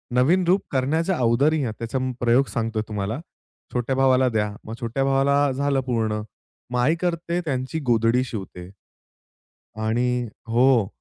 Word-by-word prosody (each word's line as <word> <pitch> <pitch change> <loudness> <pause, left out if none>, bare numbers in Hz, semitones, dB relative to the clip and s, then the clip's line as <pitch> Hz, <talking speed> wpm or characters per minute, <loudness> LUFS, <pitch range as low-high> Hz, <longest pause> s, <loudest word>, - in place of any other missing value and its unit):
नवीन 165 +9 +4
रूप 185 +3 +4
करण्याच्या 160 +7 0
अगोदरही 135 +5 +2
त्याचा 115 +3 -2 0.2
प्रयोग 125 +3 +3
सांगतोय 115 -1 -1
तुम्हाला, 105 +3 -3 0.5
छोट्या 125 +2 -1
भावाला 130 -1 +4
द्या, 105 -2 0
मग 110 - -6
छोट्या 120 +4 -1
भावाला 140 +1 +2
झालं 140 0 0
पूर्ण 110 -3 0 0.5
मग 125 - 0
आई 150 +7 +3
करते 170 0 -1
त्यांची 130 +2 -2
गोधडी 115 +1 +3
शिवते. 95 -6 -7 1.2
आणि 125 +2 +1 0.2
हो 120 -2 +4
125 Hz, 130 wpm, -23 LUFS, 115-140 Hz, 1.2 s, नवीन